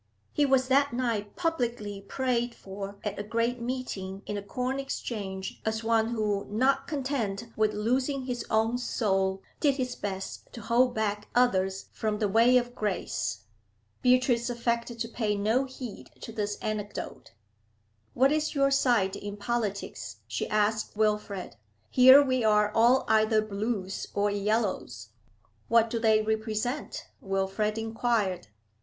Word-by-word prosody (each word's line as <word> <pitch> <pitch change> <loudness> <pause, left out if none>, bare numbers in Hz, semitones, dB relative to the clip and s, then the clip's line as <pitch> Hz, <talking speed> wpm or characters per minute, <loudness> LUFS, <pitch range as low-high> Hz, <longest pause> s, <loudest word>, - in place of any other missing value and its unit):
He 290 -1 +3
was 260 -1 +3
that 280 0 +3
night 230 -5 -2
publicly 240 - -2
prayed 240 +2 -1
for 195 +1 -8
at 210 -1 -3
a - - -2
great 230 +3 -1
meeting 215 -6 -4
in - - -4
the 205 - -3
Corn 250 +6 -3
Exchange 200 -8 -5
as 220 +1 -2
one 225 -1 +2
who, 210 -3 -1
not 255 +6 +2
content 255 -7 -2
with 215 -1 +1
losing 255 +5 0
his 245 -3 -3
own 225 +2 +2
soul, 195 -5 0 0.2
did 285 -3 +3
his 255 -2 -2
best 195 -1 -6
to 235 - -8
hold 240 +3 +2
back 210 -1 -1
others 195 -6 +2
from 215 -1 -1
the 210 - +1
way 230 +5 +5
of 245 0 -1
grace. 180 - -2 0.6
Beatrice 250 -1 +3
affected 235 0 -1
to 230 - -1
pay 220 -3 -1
no 220 +6 +1
heed 260 -4 -8
to - - -7
this 210 -2 -2
anecdote. 210 -1 -5 0.8
'What 265 +3 +4
is 305 0 0
your 275 0 +3
side 235 -8 +3
in 205 0 -6
politics?' 210 -2 -3
she - - -3
asked 215 0 0
Wilfrid. 210 - -1 0.3
'Here 260 +3 +9
we 255 -3 0
are 210 -1 +4
all 240 +4 +4
either 220 0 +4
Blues 205 -2 -3
or 205 0 +2
Yellows.' 200 - -1 0.6
'What 230 -1 +4
do 230 - -1
they 220 -1 +4
represent?' 220 +4 -2 0.2
Wilfrid 195 +2 -1
inquired. 225 - -1
220 Hz, 145 wpm, -28 LUFS, 205-245 Hz, 0.8 s, Here